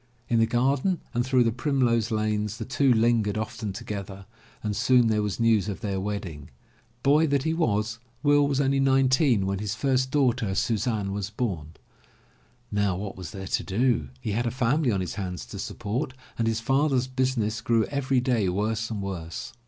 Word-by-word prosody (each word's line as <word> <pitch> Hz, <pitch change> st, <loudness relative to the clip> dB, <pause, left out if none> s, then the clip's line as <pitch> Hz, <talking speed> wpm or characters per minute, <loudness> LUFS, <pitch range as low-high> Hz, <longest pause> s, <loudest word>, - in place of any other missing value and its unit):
In 115 Hz, -, +3 dB
the 115 Hz, -, +4 dB
garden 135 Hz, +9 st, +1 dB
and 120 Hz, -, +1 dB
through 130 Hz, -1 st, +3 dB
the 115 Hz, -, +2 dB
primrose 120 Hz, -3 st, +1 dB
lanes 105 Hz, -1 st, -1 dB
the -, -, -5 dB
two 135 Hz, 0 st, +2 dB
lingered 115 Hz, -3 st, +2 dB
often 110 Hz, -1 st, -4 dB
together 100 Hz, -3 st, -6 dB, 0.4 s
and 105 Hz, -1 st, -2 dB
soon 125 Hz, -1 st, +4 dB
there 105 Hz, -1 st, +2 dB
was 105 Hz, 0 st, -2 dB
news 110 Hz, -3 st, +3 dB
of 100 Hz, -, -5 dB
their 100 Hz, -4 st, -2 dB
wedding. 95 Hz, -7 st, -5 dB, 0.5 s
Boy 150 Hz, +3 st, +4 dB
that 140 Hz, -2 st, +1 dB
he 160 Hz, -, 0 dB
was. 110 Hz, -8 st, 0 dB, 0.2 s
Will 145 Hz, -1 st, +4 dB
was 140 Hz, -1 st, 0 dB
only 140 Hz, 0 st, +2 dB
nine 135 Hz, -1 st, +4 dB
teen 130 Hz, -7 st, +3 dB
when 95 Hz, 0 st, -1 dB
his 105 Hz, -1 st, -3 dB
first 130 Hz, +1 st, +1 dB
daughter, 125 Hz, -8 st, +1 dB
Suzanne, 110 Hz, -2 st, 0 dB
was 100 Hz, 0 st, -3 dB
bom. 95 Hz, -9 st, -3 dB, 1.0 s
Now 100 Hz, -3 st, +1 dB
what 100 Hz, 0 st, -5 dB
was 90 Hz, -4 st, -7 dB
there 95 Hz, +2 st, -7 dB
to -, -, -1 dB
do? 110 Hz, -, +1 dB
He 105 Hz, -, -3 dB
had 120 Hz, +4 st, 0 dB
a -, -, +2 dB
family 130 Hz, +3 st, +1 dB
on 95 Hz, -3 st, 0 dB
his 90 Hz, -, -4 dB
hands 90 Hz, -2 st, -5 dB
to -, -, -8 dB
support 125 Hz, +7 st, -3 dB, 0.2 s
and 115 Hz, -, 0 dB
his 115 Hz, 0 st, 0 dB
father's 135 Hz, +1 st, +2 dB
business 130 Hz, -4 st, -1 dB
grew 115 Hz, -1 st, +2 dB
every 135 Hz, -2 st, 0 dB
day 120 Hz, -7 st, +1 dB
worse 110 Hz, +4 st, -1 dB
and 105 Hz, -3 st, -4 dB
worse. 85 Hz, -4 st, -5 dB
115 Hz, 190 wpm, -26 LUFS, 100-130 Hz, 1.0 s, the